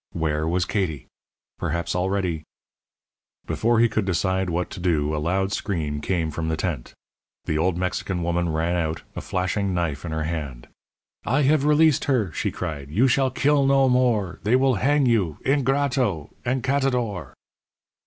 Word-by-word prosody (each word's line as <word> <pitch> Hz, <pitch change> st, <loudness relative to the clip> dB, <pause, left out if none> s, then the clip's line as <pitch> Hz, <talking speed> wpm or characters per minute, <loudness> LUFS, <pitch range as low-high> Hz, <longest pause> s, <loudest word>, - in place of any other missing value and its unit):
Where 80 Hz, -1 st, -1 dB
was 90 Hz, +2 st, +1 dB
Katie? 85 Hz, -, -2 dB, 0.5 s
Perhaps 85 Hz, +2 st, -2 dB
already 90 Hz, -3 st, -1 dB, 1.0 s
Before 115 Hz, 0 st, +1 dB
he 120 Hz, -, +6 dB
could 110 Hz, -1 st, -1 dB
decide 95 Hz, 0 st, 0 dB
what 85 Hz, +2 st, -2 dB
to -, -, -7 dB
do 80 Hz, -4 st, +1 dB
a 75 Hz, -, -2 dB
loud 95 Hz, +4 st, 0 dB
scream 80 Hz, -8 st, -2 dB
came 85 Hz, -2 st, -1 dB
from 80 Hz, +2 st, -3 dB
the 80 Hz, 0 st, -1 dB
tent. -, -, -4 dB, 0.5 s
The 75 Hz, -, 0 dB
old 85 Hz, +1 st, +1 dB
Mexican 90 Hz, 0 st, -2 dB
woman 85 Hz, 0 st, 0 dB
ran 80 Hz, +2 st, 0 dB
out, 80 Hz, -1 st, -2 dB
a -, -, -4 dB
flashing 95 Hz, +1 st, -1 dB
knife 80 Hz, -5 st, -2 dB
in 85 Hz, -, -5 dB
her 80 Hz, 0 st, -2 dB
hand. 75 Hz, -7 st, -5 dB, 0.6 s
"I 135 Hz, +6 st, +1 dB
have 145 Hz, +1 st, +3 dB
released 150 Hz, 0 st, +4 dB
her," 120 Hz, -, +1 dB
she -, -, -1 dB
cried. 70 Hz, -3 st, -5 dB
"You 110 Hz, -, +3 dB
shall 130 Hz, +1 st, +2 dB
kill 140 Hz, +2 st, +2 dB
no 135 Hz, -1 st, +4 dB
more. 120 Hz, -7 st, +1 dB
They 110 Hz, +5 st, +2 dB
will 130 Hz, 0 st, +3 dB
hang 145 Hz, +1 st, +3 dB
you 105 Hz, -, +1 dB
ingrato 135 Hz, -, +1 dB, 0.2 s
_encatador! 125 Hz, -, 0 dB
95 Hz, 160 wpm, -24 LUFS, 80-125 Hz, 1.0 s, he